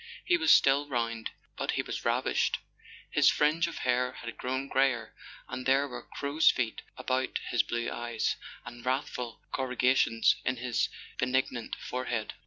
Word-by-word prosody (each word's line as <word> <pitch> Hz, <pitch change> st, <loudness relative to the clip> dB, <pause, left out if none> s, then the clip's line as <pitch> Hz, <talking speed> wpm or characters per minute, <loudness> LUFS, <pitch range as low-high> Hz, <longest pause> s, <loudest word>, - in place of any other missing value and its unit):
He 355 Hz, -, +4 dB
was 345 Hz, -1 st, +3 dB
still 140 Hz, +2 st, +5 dB
round, 115 Hz, -4 st, -2 dB, 0.3 s
but -, -, -1 dB
he -, -, 0 dB
was -, -, -5 dB
ravaged. -, -, +1 dB, 0.5 s
His -, -, +5 dB
fringe 155 Hz, +3 st, +2 dB
of 170 Hz, -, -6 dB
hair 125 Hz, 0 st, +1 dB
had 115 Hz, -1 st, -7 dB
grown 130 Hz, +2 st, -3 dB
greyer, 130 Hz, -5 st, +1 dB, 0.3 s
and 130 Hz, -, -5 dB
there 135 Hz, +2 st, +4 dB
were 130 Hz, -, -7 dB
crow's 145 Hz, +3 st, +3 dB
feet 120 Hz, -4 st, -1 dB, 0.2 s
about 130 Hz, +1 st, -1 dB
his 120 Hz, -, +4 dB
blue 120 Hz, 0 st, -3 dB
eyes, 120 Hz, -1 st, -1 dB, 0.3 s
and 120 Hz, -1 st, -9 dB
wrathful 125 Hz, -2 st, -2 dB
corrugations 125 Hz, -3 st, +2 dB
in 130 Hz, -, 0 dB
his 125 Hz, 0 st, 0 dB, 0.3 s
benignant 125 Hz, -2 st, 0 dB
forehead. 125 Hz, -3 st, -3 dB
125 Hz, 150 wpm, -30 LUFS, 120-135 Hz, 0.5 s, still